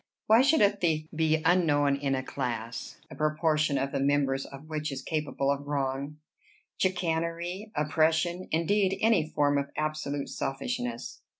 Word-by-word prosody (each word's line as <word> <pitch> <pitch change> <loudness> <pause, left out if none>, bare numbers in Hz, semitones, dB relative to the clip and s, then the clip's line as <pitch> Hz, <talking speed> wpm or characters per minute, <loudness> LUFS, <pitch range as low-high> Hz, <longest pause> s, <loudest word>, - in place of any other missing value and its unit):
Why 220 +3 +6
should 285 +4 +4
a 200 - +6
thief 160 -5 0
be 160 0 +2
unknown 150 -5 +3
in 140 -1 -1
a 130 - -2
class, 120 -4 -4
a - - -8
proportion 155 -1 +1
of 135 +1 -1
the - - -1
members 135 -1 +1
of 140 +2 -11
which 155 -1 -3
is 135 -1 -5
capable 150 -3 -1
of 140 0 -3
wrong, 140 +1 -2 0.6
chicanery, 175 +2 -1
oppression, 160 +4 +1
indeed 190 +4 +2
any 215 -9 +3
form 145 -1 +2
of 140 0 -4
absolute 155 -2 -2
selfishness?" 120 -7 -4
150 Hz, 145 wpm, -28 LUFS, 140-165 Hz, 0.6 s, Why